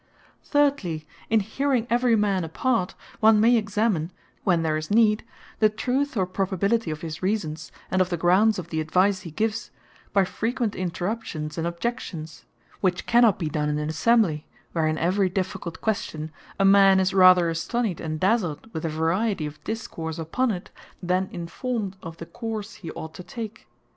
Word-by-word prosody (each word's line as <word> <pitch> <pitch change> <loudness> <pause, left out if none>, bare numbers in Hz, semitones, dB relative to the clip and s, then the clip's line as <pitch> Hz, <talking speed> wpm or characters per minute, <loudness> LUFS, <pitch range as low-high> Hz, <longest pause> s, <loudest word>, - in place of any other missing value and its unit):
Thirdly, 275 - +1 0.2
in 220 -1 +4
hearing 250 +3 0
every 240 -1 +3
man 200 -4 +1
apart, 185 +4 -1 0.2
one 220 -1 +6
may 235 +3 +5
examine 205 -6 0 0.3
(when 175 -4 +2
there 155 -1 +1
is 155 0 -4
need) 215 0 +4 0.4
the 215 - +5
truth, 255 +5 -1
or 190 - +2
probability 195 +3 0
of 155 0 -4
his 160 -2 -6
reasons, 160 -6 -2 0.2
and 185 - +3
of 185 - +1
the 175 - -1
grounds 190 +6 +4
of 175 -2 -6
the 160 -1 -1
advise 185 +5 +2
he 170 - -8
gives, 215 +7 -2 0.4
by 195 - +4
frequent 230 +2 -2
interruptions, 175 -4 -3
and 165 +1 -1
objections; 170 -5 -5 0.3
which 180 -2 0
cannot 235 -3 +5
be 165 - -2
done 150 0 -1
in 150 - 0
an 150 0 -2
Assembly, 160 -1 +2 0.2
where 160 -2 +1
(in 155 0 0
every 185 +3 +2
difficult 180 -2 -4
question) 160 -8 -2 0.3
a 195 - +4
man 195 -1 +7
is 190 0 +1
rather 185 -2 +7
astonied, 180 +4 -1
and 155 -1 -3
dazled 195 0 0
with 160 - -3
the 165 - -2
variety 165 +4 0
of 150 0 -8
discourse 165 -8 -5
upon 170 +11 0
it, 180 -5 -4 0.3
than 185 +2 0
informed 195 +4 -4
of 165 0 -8
the 165 - -7
course 220 +4 -5
he 170 - -9
ought 160 0 -7
to - - -9
take. 225 +2 -8
190 Hz, 175 wpm, -25 LUFS, 165-220 Hz, 0.4 s, man